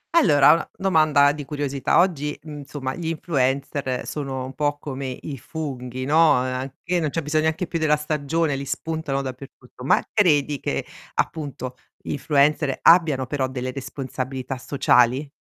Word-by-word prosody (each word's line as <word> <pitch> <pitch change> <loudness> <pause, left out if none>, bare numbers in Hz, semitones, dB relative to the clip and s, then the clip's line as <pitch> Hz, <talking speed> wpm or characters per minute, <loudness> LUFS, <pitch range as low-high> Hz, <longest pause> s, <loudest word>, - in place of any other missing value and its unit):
Allora, 150 - +6
una 165 - -1
domanda 155 -6 +4
di 145 0 -6
curiosità. 140 -1 -1
Oggi, 155 -5 +1
uhm, 150 -2 -8
insomma, 135 -2 -5
gli 170 +1 -5
influencer 140 -4 -1
sono 135 -3 -4
un 130 - -8
po' 145 0 0
come 140 -2 -5
i 140 -4 -7
funghi, 130 -4 -5
no, 155 +1 +5
a 125 0 +1
e 130 - -2
anche 135 +7 -3
non 155 -3 0
c'è 165 +3 -3
bisogno 155 +1 +1
neanche 160 +4 0
più 165 - -3
della 155 -1 +3
stagione, 150 0 -1
li 135 - -4
spuntano 155 -2 -3
dappertutto 130 -1 -10
ma - - +4
credi 150 -8 +3
che - - -2 0.3
appunto, 135 -5 -3 0.2
gli - - -7
influencer 145 -1 +2
abbiano 160 -6 +5
però 135 0 -1
delle 130 -1 -4
responsabilità 130 0 -5
sociali? 130 0 +2
145 Hz, 160 wpm, -23 LUFS, 130-155 Hz, 0.3 s, Allora